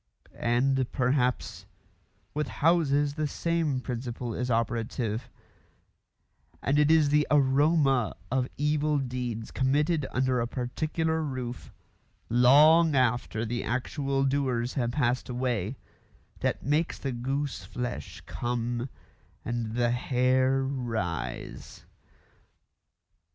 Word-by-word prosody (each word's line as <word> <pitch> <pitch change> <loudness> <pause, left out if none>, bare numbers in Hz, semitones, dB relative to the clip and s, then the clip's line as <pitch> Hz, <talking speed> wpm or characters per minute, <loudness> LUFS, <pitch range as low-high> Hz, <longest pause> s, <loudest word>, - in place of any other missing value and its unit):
And, 130 +2 +1
perhaps, 125 -1 0 0.7
with 150 +1 -1
houses 145 -3 +2
the 155 0 -1
same 165 -3 -1
principle 120 -1 -4
is 125 +3 -3
operative, 115 0 -1 1.3
and 140 +2 +1
it 150 0 +4
is 160 -2 +5
the 150 +1 +3
aroma 140 - +3 0.2
of 130 -1 +1
evil 150 +1 +1
deeds 125 -4 -4
committed 145 +3 +1
under 130 -1 +1
a 115 - -1
particular 155 +6 -2
roof, 130 -5 -5 0.6
long 150 +6 +6
after 120 -3 +1
the 120 +2 -2
actual 135 +3 -1
doers 130 -3 0
have 120 -4 0
passed 125 -3 0
away, 125 -3 -2 0.6
that - - -1
makes 150 +4 0
the 135 - -3
gooseflesh 125 - -4
come 120 +1 -3 0.6
and 115 -2 -3
the 120 -1 +2
hair 130 +2 +2
rise. 110 - -4
130 Hz, 100 wpm, -28 LUFS, 120-145 Hz, 1.3 s, long